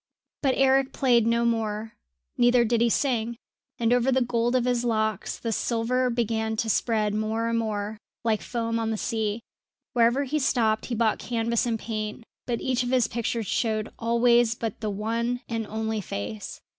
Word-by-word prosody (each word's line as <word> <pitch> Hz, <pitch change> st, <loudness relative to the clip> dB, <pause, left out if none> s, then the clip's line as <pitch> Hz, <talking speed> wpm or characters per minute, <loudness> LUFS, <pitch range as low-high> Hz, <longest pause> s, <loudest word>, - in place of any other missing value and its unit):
But 270 Hz, -3 st, +2 dB
Eric 270 Hz, 0 st, +3 dB
played 240 Hz, -4 st, +3 dB
no 235 Hz, 0 st, +2 dB
more, 220 Hz, -1 st, -1 dB, 0.4 s
neither 245 Hz, 0 st, +4 dB
did 230 Hz, 0 st, +1 dB
he 235 Hz, -, +4 dB
sing; 235 Hz, -2 st, 0 dB, 0.4 s
and 235 Hz, 0 st, +2 dB
over 245 Hz, +2 st, +3 dB
the 260 Hz, 0 st, +3 dB
gold 240 Hz, +1 st, 0 dB
of 250 Hz, -1 st, +2 dB
his 245 Hz, -1 st, +1 dB
locks 220 Hz, -3 st, -1 dB
the 230 Hz, -, -3 dB
silver 245 Hz, +3 st, 0 dB
began 225 Hz, -2 st, -1 dB
to 220 Hz, 0 st, 0 dB
spread 215 Hz, -1 st, +1 dB
more 220 Hz, +2 st, -1 dB
and 230 Hz, 0 st, +1 dB
more, 215 Hz, -1 st, -3 dB, 0.2 s
like 220 Hz, -2 st, +1 dB
foam 230 Hz, -1 st, -2 dB
on 225 Hz, -1 st, -1 dB
the 220 Hz, -, -1 dB
sea. 220 Hz, 0 st, -2 dB, 0.5 s
Wherever 240 Hz, +3 st, +3 dB
he 295 Hz, +3 st, -1 dB
stopped 225 Hz, -5 st, +1 dB
he 240 Hz, -, -2 dB
bought 225 Hz, -1 st, +1 dB
canvas 235 Hz, 0 st, 0 dB
and 230 Hz, -1 st, 0 dB
paint, 215 Hz, 0 st, -4 dB, 0.2 s
but 235 Hz, -2 st, -1 dB
each 255 Hz, -1 st, 0 dB
of 245 Hz, -, -2 dB
his 250 Hz, -3 st, +3 dB
pictures 230 Hz, -1 st, -2 dB
showed 215 Hz, +1 st, -1 dB
always 235 Hz, 0 st, +3 dB
but 225 Hz, -3 st, -4 dB
the 215 Hz, -, -1 dB
one 230 Hz, +4 st, -1 dB
and 225 Hz, -2 st, -3 dB
only 220 Hz, 0 st, -2 dB
face. 105 Hz, -, -6 dB
230 Hz, 180 wpm, -26 LUFS, 220-240 Hz, 0.5 s, neither